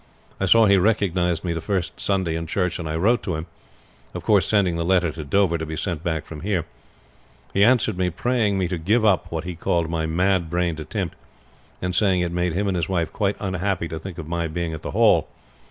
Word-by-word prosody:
I 95 - 0
saw 115 +4 +6
he 100 -1 +5
recognized 90 -4 +1
me 85 -2 -1
the 80 - -4
first 95 0 -2
Sunday 95 -4 0
in 80 0 -4
church, 90 0 -1
and 80 -2 -4
I 80 - -2
wrote 110 +9 +2
to 90 - -3
him; 80 +1 -4 0.7
of - - -5
course - - +3
sending 100 -5 +2
the 85 - -1
letter 90 -1 +2
to 80 0 -7
Dover 85 +3 +2
to 80 - -3
be 80 - -4
sent 85 -4 -3
back 80 -3 -2
from 80 - -8
there. 90 -2 -1 0.9
He 100 - +4
answered 115 -5 +3
me 90 -1 +2
praying 110 +1 0
me 95 -2 0
to 90 -1 -3
give 110 +7 +2
up 100 -4 +2
what 80 -1 -3
he 90 0 -5
called 85 0 -1
my 80 -1 -1
mad 90 +1 +1
brained 85 -2 -1
attempt, 85 +3 -4 0.7
and 90 0 -1
saying 95 0 +2
it 85 -1 -1
made 90 -1 0
him 100 +4 0
and 95 - 0
his 85 -3 -1
wife 85 -4 -1
quite 100 -1 0
unhappy 95 -2 -1
to 80 - -5
think 90 +1 -8
of 80 -3 -7
my 85 0 -1
being 80 +1 -3
at 80 - -6
the - - -5
Hall. - - +4
90 Hz, 235 wpm, -23 LUFS, 80-100 Hz, 0.9 s, saw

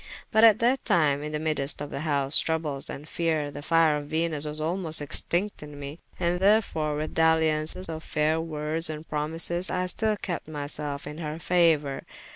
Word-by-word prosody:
But 220 - +4
at 220 -2 +8
that 245 +4 +1
tyme, 145 -4 +2
in 150 +1 -5
the 155 - -1
myddest 150 -2 -1
of 145 0 -6
those 140 -1 +1
troubles 155 -4 -2
and 145 +2 -7
feare, 155 -3 -1
the 145 - -8
fyre 160 -1 +3
of 145 0 -6
Venus 160 -1 -1
was 150 0 -4
almost 160 0 +2
extincte 175 +6 0
in 150 -1 -10
mee: 145 +3 -7 0.2
and 175 0 0
therefore 190 -7 +2
with 155 +1 -4
daliaunce 160 +2 +2
of 160 -1 -6
fayre 155 +1 +1
woordes 160 0 0
and 155 +1 -6
promises, 165 +4 -1
I 185 0 -1
styll 215 +3 0
kepte 175 -7 -4
my 150 -2 -5
selfe 145 -1 -4
in 150 +2 -7
her 155 -2 -4
fauour. 165 -5 +2
155 Hz, 185 wpm, -26 LUFS, 150-170 Hz, 0.2 s, at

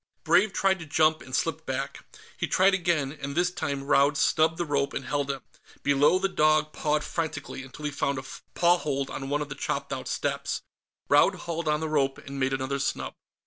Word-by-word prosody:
Brave 180 +6 +4
tried 190 -1 +2
to 165 - -8
jump 155 +1 +3
and 130 - -5
slipped 160 +1 -1
back. 130 0 -3 0.3
He - - -2
tried 195 +1 +4
again, 170 -7 +1
and 140 0 -4
this 175 +1 +2
time 140 -5 -3
Raud 140 0 +3
snubbed 160 +3 +3
the 175 - -1
rope 140 -2 0
and 135 - -3
held 145 -1 -1
him. 135 -1 -3 0.4
Below 145 +5 +4
the 195 +1 +1
dog 155 -4 +2
pawed 150 0 0
frantically, 155 -5 -4
until 135 +3 -9
he 145 - -1
found 140 -1 -1
a 130 - -4 0.3
paw 175 0 +4
hold 140 -3 -2
on 135 0 -5
one 145 +1 0
of 145 - -11
the - - -4
chopped - - -3
out - - -5
steps. - - -2 0.4
Raud - - +5
hauled 170 -1 -3
on 150 0 +1
the 160 - -1
rope, 140 -3 +1
and 140 0 -8
made 130 0 +1
another 135 +1 -1
snub. 140 - -2
150 Hz, 210 wpm, -27 LUFS, 140-165 Hz, 0.4 s, Raud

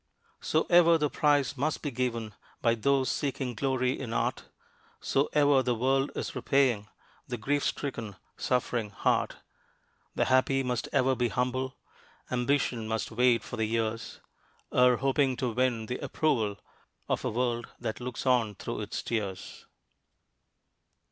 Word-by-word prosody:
So 160 - +1
ever 170 -1 +6
the 150 -2 0
price 145 -3 +2
must 145 +4 -1
be 145 - -2
given 115 -3 -2 0.3
By 115 - +3
those 130 +3 +2
seeking 135 -3 -2
glory 130 +1 0
in 120 -4 -5
art; - - -1 0.5
So 135 +2 +1
ever 145 -2 +5
the 125 -1 0
world 135 +4 +1
is - - -3
repaying 125 -7 +2 0.4
The 125 - -3
grief 145 +5 0
stricken, 115 -8 -3 0.2
suffering 120 -3 -1
heart. 100 - 0 0.8
The - - +2
happy 130 +1 +3
must 125 -2 -2
ever 130 +1 +3
be 125 -1 +1
humble; 130 +2 -2 0.5
Ambition 125 -2 0
must 110 +1 -2
wait 120 +1 +3
for - - -7
the 110 - +1
years, 115 0 -2 0.5
Ere 125 -1 +5
hoping 135 -1 +1
to 125 0 -1
win 120 -1 0
the 125 +3 -4
approval 115 -10 0 0.5
Of - - -1
a - - 0
world 120 0 -1
that 110 - -4
looks 125 +1 -5
on 120 -5 +2
through - - -5
its - - -4
tears. 100 -5 -4
125 Hz, 145 wpm, -29 LUFS, 115-135 Hz, 0.8 s, ever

